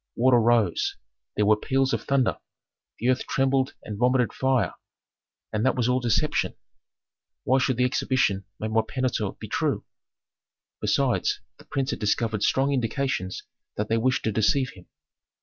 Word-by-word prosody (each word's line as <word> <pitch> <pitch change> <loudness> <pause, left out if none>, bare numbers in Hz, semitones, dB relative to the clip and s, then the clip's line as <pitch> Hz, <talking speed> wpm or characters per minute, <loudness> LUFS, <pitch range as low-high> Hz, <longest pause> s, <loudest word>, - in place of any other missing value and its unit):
Water 125 0 +4
rose; 115 -6 +2 0.4
there 105 - +2
were 105 +1 +5
peals 135 +4 0
of - - -1
thunder; 135 -3 +1 0.6
the 120 - -2
earth 130 0 +1
trembled 135 0 +1
and 105 -2 -6
vomited 125 -1 +2
fire. 130 -9 +1 0.8
And 105 +1 0
that 130 - +2
was 120 -2 +1
all 125 0 +2
deception. 120 -4 0 0.9
Why 130 +1 +3
should 130 -2 +1
the 125 - +3
exhibition 130 -6 +1
made 110 0 -3
by 110 - +4
Pentuer 130 +2 -2
be - - -8
true? - - -1 0.9
Besides, - - +1 0.2
the - - -16
prince 135 +1 -2
had - - -4
discovered 105 0 0
strong 135 +5 +2
indications 125 -6 -2 0.3
that 105 +1 -2
they 115 - +2
wished 130 +3 +1
to 110 - 0
deceive 125 +6 +2
him. 90 -2 -16
125 Hz, 155 wpm, -25 LUFS, 110-130 Hz, 0.9 s, were